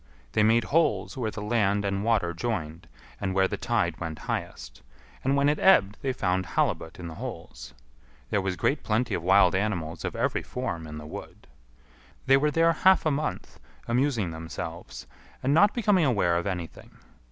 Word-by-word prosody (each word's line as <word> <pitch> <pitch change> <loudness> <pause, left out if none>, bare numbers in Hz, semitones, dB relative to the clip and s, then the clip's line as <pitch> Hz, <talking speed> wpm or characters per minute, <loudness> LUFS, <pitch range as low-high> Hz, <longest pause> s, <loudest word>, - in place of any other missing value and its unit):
They - - +2
made 115 +2 +4
holes 160 +5 +1
where 120 -5 -2
the 105 -1 -6
land 105 -2 +1
and 100 0 -1
water 105 -7 +1
joined 85 -5 -4 0.3
and 95 -2 -2
where 95 0 +4
the - - -3
tide - - -1
went 80 -2 -5
highest; - - -5 0.4
and 135 +1 +2
when 140 0 +3
it 150 +1 +1
ebbed 105 - +4
they 135 - 0
found 95 -6 0
halibut 80 -2 -1
in 90 - -7
the 80 - -7
holes. - - -8 0.6
There 100 - +2
was 95 -1 -2
great 140 +9 0
plenty 110 +3 0
of - - -1
wild 95 +1 +5
animals 90 -5 -2
of - - -4
every - - 0
form 85 -11 -5
in 75 0 -8
the 75 - -8
wood. 75 - -10 0.8
They 135 - +6
were 150 +2 +2
there 165 +2 +3
half 190 +3 +4
a 155 - +3
month, 150 +2 -4 0.3
amusing 120 - 0
themselves, 80 -5 -7 0.4
and 135 +2 +2
not 200 +6 +5
becoming 205 -8 +2
aware 100 -10 +2
of 85 +3 -1
anything. 90 -4 -6
100 Hz, 180 wpm, -27 LUFS, 85-135 Hz, 0.8 s, They